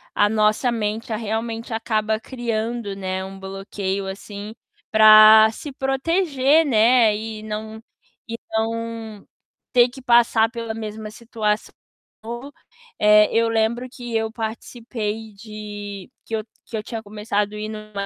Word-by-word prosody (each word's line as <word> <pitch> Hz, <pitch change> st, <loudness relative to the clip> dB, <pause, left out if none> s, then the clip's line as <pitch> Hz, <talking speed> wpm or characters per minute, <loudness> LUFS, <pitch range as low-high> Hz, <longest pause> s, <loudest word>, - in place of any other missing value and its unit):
a 205 Hz, -, +4 dB
nossa 215 Hz, +3 st, +2 dB
mente, 220 Hz, 0 st, -3 dB
realmente, 225 Hz, +1 st, -4 dB
acaba 220 Hz, -1 st, -1 dB
criando, 230 Hz, -3 st, -3 dB
né, 190 Hz, -1 st, -3 dB
um 195 Hz, 0 st, -9 dB
bloqueio 195 Hz, 0 st, -4 dB
assim 205 Hz, +2 st, -8 dB, 0.3 s
pra 215 Hz, 0 st, +9 dB
se 290 Hz, +6 st, -8 dB
proteger, 280 Hz, +2 st, +2 dB
né, 230 Hz, -3 st, +4 dB
e 215 Hz, 0 st, -6 dB
não 220 Hz, +1 st, -6 dB, 0.5 s
e 230 Hz, 0 st, -5 dB
não 225 Hz, -1 st, -3 dB, 0.5 s
ter 245 Hz, -1 st, +5 dB
que 265 Hz, +2 st, -12 dB
passar 235 Hz, -2 st, +4 dB
pela 230 Hz, -1 st, -5 dB
mesma 215 Hz, -1 st, -6 dB
situação, 220 Hz, -2 st, -2 dB, 0.5 s
de 240 Hz, +5 st, -7 dB, 0.5 s
eh, 210 Hz, 0 st, +6 dB
eu 230 Hz, 0 st, +3 dB
lembro 225 Hz, +2 st, 0 dB
que 240 Hz, -3 st, -7 dB
eu 220 Hz, 0 st, 0 dB
participei 225 Hz, -1 st, -5 dB
de 205 Hz, -1 st, -8 dB, 0.2 s
que -, -, -10 dB
eu 215 Hz, -, -3 dB, 0.2 s
que 225 Hz, -, -5 dB
eu -, -, -3 dB
tinha 225 Hz, 0 st, -6 dB
começado 210 Hz, 0 st, -2 dB
ir 210 Hz, 0 st, -4 dB
numa 215 Hz, -2 st, -6 dB
220 Hz, 135 wpm, -22 LUFS, 210-230 Hz, 0.5 s, pra